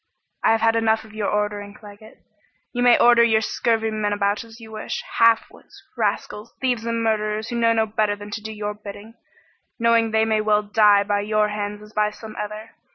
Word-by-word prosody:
"I - - +4
have 225 - 0
had 225 0 +3
enough 220 -1 +1
of 220 -1 -16
your 215 -2 -2
ordering, 205 -1 -2
Claggett. 210 +1 -15 0.5
You 245 - -2
may 245 -1 +6
order 240 0 +6
your 220 -2 +3
scurvy 225 0 0
men 210 -1 -1
about 205 +1 0
as 230 0 -15
you 220 -1 -12
wish 215 0 -5 0.2
half 230 -1 +5
wits, - - -18
rascals, 210 +3 -3
thieves 245 -3 -1
and 230 0 -1
murderers 215 0 -1
who 240 - -4
know 230 0 +3
no 225 -1 +2
better 210 -1 0
than 205 0 -10
to 215 - -5
do 220 +1 -7
your 210 -1 -4
bidding, 210 +1 -11 0.6
knowing 230 -1 +3
they 220 0 +2
may 220 -1 +1
well 210 0 +2
die 205 -1 +4
by 205 0 0
your 210 +1 +1
hands 210 0 -5
as 210 +1 -15
by 210 0 +1
some 215 +1 -11
other. 210 +1 -6
215 Hz, 210 wpm, -22 LUFS, 210-225 Hz, 0.6 s, may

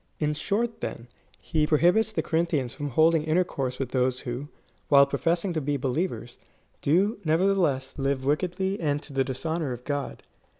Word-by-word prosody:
In 150 -1 +1
short, 225 +9 -2
then, 115 +1 -5 0.3
he 155 -1 0
prohibits 175 +9 +3
the - - -1
Corinthians 160 -7 0
from 145 -2 -4
holding 160 +4 +4
intercourse 155 -6 0
with 135 -3 -3
those 130 0 0
wlio, 125 +2 -4 0.4
while 140 -1 +7
professing 165 +7 0
to 160 - -1
be 145 +1 -1
believers, 135 -1 -3 0.4
do, 190 +9 +2
nevertheless, 160 -6 +1
live 135 -1 -1
wickedly 185 +6 0
and 145 -3 0
to 145 - -9
the 135 0 +2
dishonour 145 +2 -2
of 120 0 -9
God. 145 -1 -3
150 Hz, 160 wpm, -26 LUFS, 135-170 Hz, 0.4 s, while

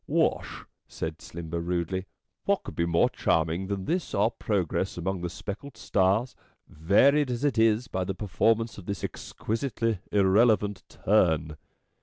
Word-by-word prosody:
"Wash," - - 0 0.2
said 80 0 -5
Slimber 85 0 -5
rudely, 90 +2 -2 0.4
"what - - +1
could - - -8
be 85 - 0
more 85 0 +4
charming 80 +4 0
than 100 -1 -3
this 175 +1 -1
our 105 +3 +3
progress 95 -2 -1
among 95 +1 -2
the 90 - -2
speckle^ 100 +9 -7
stars, 105 +4 +1 0.3
varied 130 - +3
as 120 +1 -3
it 135 -6 +1
is 115 +2 +3
by 95 -6 -2
the 95 +1 -3
performance 110 +4 +1
of 90 - -12
this 100 -4 -4
exquisitely 115 -2 -2
irrelevant 105 0 +3
turn." 80 -7 +2
100 Hz, 145 wpm, -27 LUFS, 85-115 Hz, 0.4 s, more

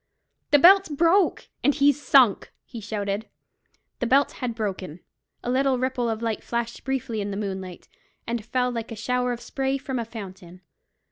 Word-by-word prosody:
"The 290 - +6
belt's 380 +5 +7
broke, 335 +6 +2 0.2
and 285 - +3
he's 290 0 +3
sunk!" 255 -8 +4
he 235 -3 -9
shouted. 205 0 -3 0.7
The 245 - -1
belt 275 +3 +3
had 245 -3 -4
broken. 185 -6 -4 0.4
A 245 - -2
little 265 0 +2
ripple 255 -1 -1
of 225 0 -3
light 225 -2 -2
flashed 235 0 -4
briefly 265 -5 -2
in 200 - -3
the 200 - -4
moonlight, 190 -3 -5 0.4
and 235 -1 -3
fell 250 +2 0
like 230 -1 -5
a - - -5
shower 250 +3 -1
of 240 -1 -5
spray 270 0 -2
from 265 -2 -4
a 230 - -3
fountain. 190 -5 -10
235 Hz, 175 wpm, -25 LUFS, 215-270 Hz, 0.7 s, belt's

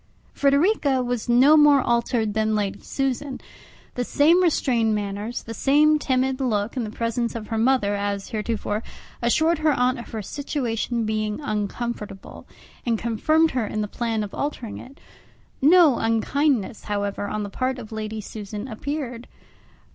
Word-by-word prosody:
Frederica 280 -2 +2
was 245 -1 -3
no 260 +6 +6
more 295 -2 +6
altered 235 -3 0
than 220 0 +1
Lady 205 -1 -2
Susan; 270 0 -3 0.5
the 245 - -2
same 315 +8 +4
restrained 240 -10 +2
manners, 205 +3 -4
the 225 - -7
same 300 +5 +4
timid 260 -1 0
look 220 -3 -1
in 250 - -1
the 215 - -4
presence 230 +1 -2
of 220 -2 -6
her 225 - -1
mother 230 -4 +2
as 200 -1 -2
heretofore, 215 -1 -2 0.4
assured 315 +7 +2
her 310 -1 +3
aunt 250 0 +1
of 235 - -9
her 220 -3 -5
situation 240 -3 -2
being 215 -1 -2
uncomfortable, 215 -3 -5 0.4
and 235 -2 0
confirmed 310 +9 +2
her 245 -4 -1
in 215 - -3
the 210 - -2
plan 225 0 -2
of 200 - -7
altering 265 -6 -4
it. 270 +2 -13 0.6
No 315 -2 +6
unkindness, 230 +1 0
however, 205 -1 -2
on 215 0 -3
the 200 - -5
part 255 +3 -1
of 230 -3 -9
Lady 220 0 -4
Susan 210 +2 -7
appeared. 250 0 -5
235 Hz, 155 wpm, -23 LUFS, 215-275 Hz, 0.6 s, no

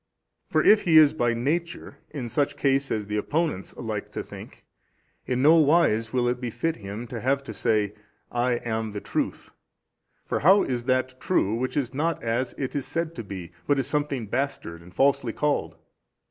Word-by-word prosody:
For - - +2
if 210 0 +6
he 165 -3 +6
is 155 -2 +7
by 120 -1 +1
nature 165 +8 -3
in 130 -5 -5
such 140 +5 0
case 135 0 +1
as 105 -2 -1
the 105 +1 -3
opponents 150 - -1
like - - -4
to - - -3
think, - - -12 0.6
in 125 0 0
no 160 +3 +7
wise 145 -8 +3
will 125 -1 +1
it 125 +1 -1
befit 130 +7 -2
him 105 +2 -6
to 115 -1 -6
have 140 +3 +1
to - - -7
say, 105 -3 +1 0.4
I 120 +1 +1
am 110 -2 -3
the 105 - -3
truth: - - -3 0.7
for - - -1
how 190 +6 +6
is 120 -2 -3
that 130 0 0
true 110 - +1
which 125 +3 -2
is 135 -2 -1
not 160 +3 -1
as 120 +2 -1
it 130 - -3
is 140 - -2
said 165 -1 -2
to 120 - -6
be, 95 -4 -8 0.2
but 145 - +3
is 135 - 0
something 145 -5 -1
bastard 105 -8 -3
and 90 +1 -14
falsely 130 0 +2
called? 150 -1 -1
130 Hz, 190 wpm, -26 LUFS, 115-145 Hz, 0.7 s, is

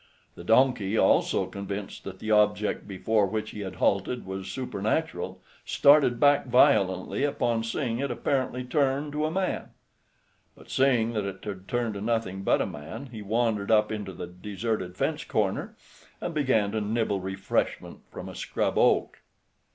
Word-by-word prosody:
The - - -11
donkey, 115 -1 +3
also - - +3
convinced 100 0 -6
that 95 -1 -7
the 110 +3 -4
object 105 0 +2
before 105 +2 +1
which 110 +2 -3
he - - -8
had 95 -3 -5
halted 100 +7 0
was 95 0 -5
supernatural, 110 - -2 0.2
started 140 -4 +4
back 145 0 +4
violently 115 -5 +3
upon 120 -5 0
seeing 115 0 -2
it 140 +1 -1
apparently 125 +1 -1
turn 140 +2 0
to 150 +1 -1
a - - -1
man. 185 +3 -1 0.9
But - - -14
seeing 120 -4 +2
that 105 -3 -1
it 95 -1 -6
had 95 -2 -6
turned 120 -2 -1
to 100 - -6
nothing 110 -4 -1
but - - +2
a - - -2
man, 110 - -8
he 110 -3 -7
wandered 105 -1 0
up 105 -1 +4
into 105 -3 -4
the 90 - -6
deserted 95 +1 -4
fence - - -1
corner, - - -1 0.4
and 175 - -4
began 130 -9 +2
to 110 0 -1
nibble 105 -1 0
refreshment 95 +1 -2
from - - -8
a - - -8
scrub - - -1
oak. - - +2
110 Hz, 160 wpm, -27 LUFS, 100-125 Hz, 0.9 s, started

